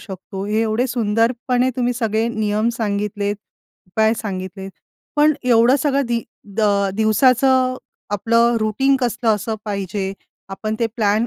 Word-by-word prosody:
शकतो. 190 0 -7
हे 215 +2 0
एवढे 225 +3 0
सुंदरपणे 245 +2 +1
तुम्ही 245 -1 +1
सगळे 225 -1 0
नियम 215 -1 0
सांगितलेत, 205 -1 -2 0.5
उपाय 220 +4 +2
सांगितलेत, 190 -2 -5 0.5
पण 300 +1 +5
एवढं 245 +1 +4
सगळं 280 0 +1
दि 235 -1 -1 0.3
द 225 - +1 0.4
दिवसाचं 255 +4 +3 0.3
आपलं 230 +3 +2
रूटीन 265 +6 +2
कसं 240 -1 -1
असलं 215 +2 -3
पाहिजे? 195 -1 -3 0.4
आपण 215 +3 -4
ते 230 - +3
प्लॅन 215 0 +2
225 Hz, 130 wpm, -20 LUFS, 205-245 Hz, 0.5 s, पण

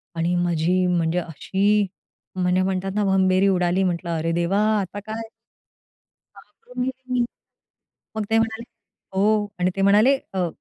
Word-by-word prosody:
आणि 170 +2 0
माझी 175 +1 +1
म्हणजे 175 -1 +1
अशी 195 +5 0 0.5
म्हणजे 180 0 +1
म्हणतात 190 0 -1
ना 210 - +1
भंबेरी 190 0 +3
उडाली 180 0 +2
म्हंटलं, 175 -1 -2
"अरे! 165 +1 -1
देवा 175 +4 +1 0.2
आता 200 +2 -6
काय? 220 +2 -7 1.1
घाबरून 460 - -8
गेले 260 0 -5
मी. 245 -1 +2 0.9
मग 220 - -1
ते 225 - +3
म्हणाले, 225 +1 -1 0.5
"हो" 210 +1 +2
आणि 180 +1 +1
ते 195 - -1
म्हणाले 210 +7 +5 0.2
अ, 180 -2 0
190 Hz, 140 wpm, -23 LUFS, 180-210 Hz, 1.1 s, म्हणाले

